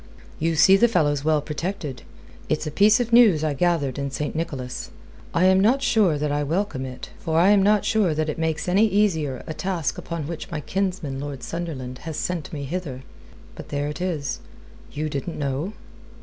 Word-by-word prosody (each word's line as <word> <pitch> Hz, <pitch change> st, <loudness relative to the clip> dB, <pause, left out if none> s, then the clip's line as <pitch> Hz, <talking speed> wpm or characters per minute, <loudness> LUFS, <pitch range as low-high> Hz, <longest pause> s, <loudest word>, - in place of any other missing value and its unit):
You 165 Hz, +1 st, +1 dB
see 190 Hz, +5 st, +7 dB
the 240 Hz, -, +5 dB
fellow's 145 Hz, -, +1 dB
well 155 Hz, -1 st, +2 dB
protected. 150 Hz, -, -4 dB, 0.5 s
It's 155 Hz, +1 st, 0 dB
a 155 Hz, -, -3 dB
piece 210 Hz, -, +5 dB
of 235 Hz, -1 st, -2 dB
news 215 Hz, -10 st, +6 dB
I 155 Hz, -2 st, +1 dB
gathered 145 Hz, -3 st, 0 dB
in 140 Hz, 0 st, -2 dB
St. 150 Hz, +2 st, -3 dB
Nicholas. 135 Hz, -6 st, -4 dB, 0.4 s
I 170 Hz, -, +1 dB
am 190 Hz, 0 st, +5 dB
not 245 Hz, +8 st, +3 dB
sure 210 Hz, -, +3 dB
that 150 Hz, 0 st, -1 dB
I 145 Hz, 0 st, 0 dB
welcome 155 Hz, -2 st, -1 dB
it, 130 Hz, -1 st, -9 dB
for 160 Hz, 0 st, 0 dB
I 180 Hz, +3 st, +5 dB
am 205 Hz, -1 st, +5 dB
not 205 Hz, +1 st, +3 dB
sure 200 Hz, -8 st, +2 dB
that 155 Hz, 0 st, 0 dB
it 155 Hz, -, -3 dB
makes 160 Hz, -1 st, -1 dB
any 200 Hz, +5 st, +4 dB
easier 165 Hz, -, +1 dB
a 160 Hz, -, -5 dB
task 175 Hz, -2 st, -2 dB
upon 170 Hz, -3 st, -5 dB
which 165 Hz, +1 st, -6 dB
my 160 Hz, -4 st, -3 dB
kinsman, 180 Hz, -6 st, -2 dB
Lord 140 Hz, -2 st, -6 dB
Sunderland, 135 Hz, -7 st, -5 dB
has 160 Hz, +1 st, -6 dB
sent 175 Hz, -4 st, -3 dB
me 145 Hz, -3 st, -5 dB
hither. 140 Hz, -4 st, -5 dB, 0.5 s
But -, -, -10 dB
there 145 Hz, 0 st, -2 dB
it 150 Hz, +2 st, -6 dB
is. 170 Hz, 0 st, -2 dB, 0.5 s
You 150 Hz, +2 st, -3 dB
didn't 150 Hz, +3 st, -4 dB
know?" 145 Hz, +7 st, -2 dB
160 Hz, 195 wpm, -24 LUFS, 145-190 Hz, 0.5 s, see